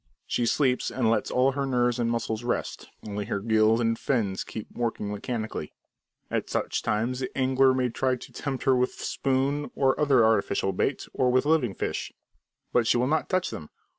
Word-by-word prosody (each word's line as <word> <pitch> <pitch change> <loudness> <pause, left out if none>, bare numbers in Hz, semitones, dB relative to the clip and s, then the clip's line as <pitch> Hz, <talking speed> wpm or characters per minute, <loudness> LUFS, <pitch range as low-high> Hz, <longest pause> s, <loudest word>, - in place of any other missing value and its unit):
She 120 - 0
sleeps 130 -1 +2
and 115 -4 +1
lets - - 0
all 130 +2 +3
her 140 0 -2
nerves 125 -1 +1
and 115 -1 +1
muscles 115 -1 -2
rest; 120 - -3 0.2
only 105 0 -3
her 100 -2 -2
gills 110 +1 +3
and 115 -1 0
fins 105 -8 0
keep 110 - -7
working 115 -3 -2
mechanically. 110 - -4 0.6
At - - -1
such - - -1
times 115 +4 -1
the 130 - -3
angler 130 0 +4
may 130 -1 +1
try 130 +2 0
to 125 - -12
tempt 135 -2 -4
her 135 -1 +4
with 125 0 +1
spoon 140 +2 -1
or 135 +1 +2
other 135 -6 +4
artificial 100 -3 +2
bait, 135 +8 -1
or 125 -1 +2
with 130 +2 +2
live 150 -10 +2
fish, - - -3 0.6
but 120 -2 +3
she - - +4
will 125 - +2
not 155 +3 0
touch 185 0 0
them! 75 - -7
125 Hz, 190 wpm, -27 LUFS, 110-130 Hz, 0.6 s, angler